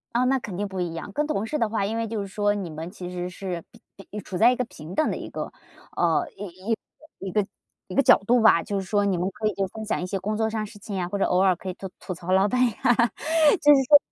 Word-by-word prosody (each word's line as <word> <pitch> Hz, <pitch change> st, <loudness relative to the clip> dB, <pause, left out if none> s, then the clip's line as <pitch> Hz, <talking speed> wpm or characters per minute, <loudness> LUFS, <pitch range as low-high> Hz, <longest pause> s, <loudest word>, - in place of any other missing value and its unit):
哦， 250 Hz, -, +3 dB
那 265 Hz, +1 st, +3 dB
肯 190 Hz, -6 st, -7 dB
定 205 Hz, 0 st, -1 dB
不 190 Hz, -1 st, -6 dB
一 170 Hz, -2 st, -2 dB
样。 165 Hz, -, -6 dB
跟 300 Hz, -, 0 dB
同 220 Hz, -8 st, -1 dB
事 300 Hz, +6 st, -2 dB
的 225 Hz, -3 st, +1 dB
话， 210 Hz, -3 st, 0 dB
因 220 Hz, +3 st, -2 dB
为 230 Hz, 0 st, -1 dB
就 220 Hz, -1 st, -3 dB
是 200 Hz, -, -5 dB
说 205 Hz, +1 st, +1 dB
你 195 Hz, -5 st, -4 dB
们 160 Hz, +2 st, -6 dB
其 180 Hz, -3 st, -7 dB
实 180 Hz, 0 st, -4 dB
是 180 Hz, -2 st, -5 dB, 0.3 s
比 200 Hz, +2 st, -9 dB
处 185 Hz, -2 st, -6 dB
在 235 Hz, +5 st, +6 dB
一 -, -, +1 dB
个 250 Hz, -, -1 dB
平 160 Hz, -4 st, -10 dB
等 310 Hz, -, +2 dB
的 -, -, -1 dB
一 -, -, -7 dB
个， -, -, -5 dB, 0.4 s
呃， 355 Hz, -3 st, +2 dB
一 190 Hz, +2 st, -6 dB
一 225 Hz, -2 st, -7 dB
一 -, -, -6 dB
个 210 Hz, -2 st, +1 dB, 0.4 s
一 -, -, -7 dB
个 275 Hz, -, +5 dB
角 -, -, +8 dB
度 240 Hz, -1 st, +4 dB
吧。 215 Hz, -6 st, +6 dB
就 200 Hz, +4 st, -3 dB
是 190 Hz, -, -5 dB
说 205 Hz, 0 st, +1 dB
你 190 Hz, -3 st, +1 dB
们 180 Hz, +2 st, 0 dB
可 215 Hz, +2 st, -2 dB
以 215 Hz, -, 0 dB, 0.2 s
分 220 Hz, 0 st, -6 dB
享 210 Hz, -, -1 dB
一 -, -, -2 dB
些 195 Hz, +1 st, -3 dB
工 215 Hz, +3 st, -2 dB
作 220 Hz, 0 st, +1 dB
上 220 Hz, 0 st, -3 dB
的 215 Hz, -, -2 dB
事 205 Hz, 0 st, -12 dB
情 200 Hz, -2 st, -5 dB
啊， 175 Hz, -, -1 dB
或 200 Hz, +2 st, -3 dB
者 -, -, +1 dB
偶 180 Hz, -, +2 dB
尔 190 Hz, -1 st, +4 dB
可 185 Hz, -, -7 dB
以 -, -, -3 dB
做 190 Hz, -, -7 dB
吐 185 Hz, -, -5 dB
槽 175 Hz, +1 st, -5 dB
老 190 Hz, +1 st, +5 dB
板 250 Hz, -, 0 dB, 0.2 s
啊。 245 Hz, -, +5 dB, 0.7 s
就 295 Hz, 0 st, +8 dB
是 270 Hz, -1 st, +4 dB
说 290 Hz, -, +10 dB
205 Hz, 320 characters per minute, -25 LUFS, 185-225 Hz, 0.7 s, 说